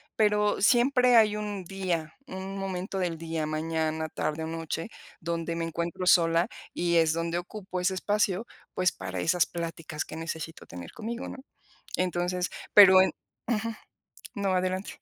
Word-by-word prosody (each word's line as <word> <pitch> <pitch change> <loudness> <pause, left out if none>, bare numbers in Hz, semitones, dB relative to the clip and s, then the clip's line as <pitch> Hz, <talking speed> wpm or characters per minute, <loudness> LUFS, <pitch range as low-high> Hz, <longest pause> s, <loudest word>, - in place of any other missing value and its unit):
Pero 210 -1 +2
siempre 250 +2 +5
hay 215 -2 +5
un 205 -3 -4
día, 175 -4 -3
un 190 -3 -6
momento 195 0 -3
del 175 -3 -1
día, 160 -1 -3
mañana, 160 0 -1
tarde 155 +1 -2
o - - -3
noche, 165 +2 -4 0.3
donde 165 0 -2
me 165 0 -1
encuentro 170 +2 -3
sola 170 0 +5 0.3
y 170 0 +1
es 160 -1 +4
donde 165 +1 -1
ocupo 185 +1 -5
ese 180 +1 +1
espacio, 205 +1 0 0.3
pues, 185 0 +2
para 95 -1 -5
esas 160 - +3
pláticas 165 -2 -5
que - - -9
necesito 165 0 -6
tener 85 -1 -9
conmigo, 235 +3 -5
¿no? - - -7 0.6
Entonces 180 0 0 0.2
pero 190 -2 +10
en 190 - +3 0.4
ujú. 230 -1 0 0.6
No, 200 -2 0
adelante. 185 +1 -2
180 Hz, 150 wpm, -28 LUFS, 165-195 Hz, 0.6 s, pero